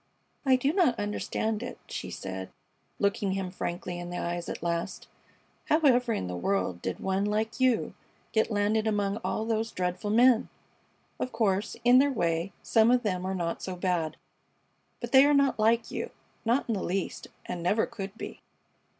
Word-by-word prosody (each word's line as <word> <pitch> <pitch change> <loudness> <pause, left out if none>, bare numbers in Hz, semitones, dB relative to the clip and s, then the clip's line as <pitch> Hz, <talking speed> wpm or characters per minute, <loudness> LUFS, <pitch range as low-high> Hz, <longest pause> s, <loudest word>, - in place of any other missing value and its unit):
"I 260 - +7
do 270 +4 +1
not 335 - +3
understand 210 +1 -2
it," - - -6
she - - -5
said, 95 0 -6 0.5
looking 200 -1 +1
him 190 -2 -3
frankly 175 -1 -4
in 175 0 -6
the 175 - -4
eyes 175 0 -3
at - - -5
last. 170 +2 -2 0.6
"How 310 - +3
ever 250 -5 +4
in 215 - -1
the 90 0 -4
world 95 - -1
did 95 - -3
one 190 +1 0
like 215 +3 -1
you 255 -3 +2 0.4
get 220 - +2
landed 215 +1 +1
among 205 -1 0
all 220 -1 -2
those 225 0 -1
dreadful 180 +3 -2
men! 235 +2 +5 0.7
Of 255 - -2
course, 210 -2 0
in 245 +1 +7
their 285 +1 +4
way, 170 -5 0
some 225 0 +4
of 250 0 +4
them 185 -3 -1
are 190 - -1
not 170 -2 -2
so 185 - -4
bad; 175 -3 -1 0.8
but 240 -1 -5
they 265 0 +8
are 290 +1 +4
not 280 -4 +3
like 225 +2 +2
you, - - -3 0.4
not 240 +5 +2
in 230 - 0
the 195 - -2
least, 190 +1 -3 0.2
and 175 -1 -4
never 205 +6 +2
could 195 0 -7
be." - - -7
205 Hz, 180 wpm, -28 LUFS, 180-235 Hz, 0.8 s, they